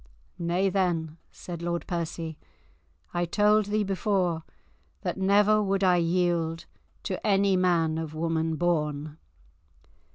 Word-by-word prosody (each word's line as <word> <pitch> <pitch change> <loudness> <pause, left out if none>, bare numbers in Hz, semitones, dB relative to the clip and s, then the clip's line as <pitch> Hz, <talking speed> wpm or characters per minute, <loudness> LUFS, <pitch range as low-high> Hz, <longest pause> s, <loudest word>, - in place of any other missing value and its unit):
"Nay, 175 +3 +1
then," 170 -4 -1
said 170 -2 -8
Lord 170 0 -2
Percy. 165 -2 -4 0.7
"I 175 0 0
told 210 +4 +3
thee 210 +1 0
before 190 -3 0 0.6
that - - -2
never 205 +2 +4
would 195 -1 0
I 180 -1 +5
yield 170 -1 0 0.4
to - - -4
any 200 -2 +3
man 170 -3 +2
of 160 -1 -5
woman 160 0 -1
born." 150 -3 -1
175 Hz, 120 wpm, -27 LUFS, 165-195 Hz, 0.7 s, I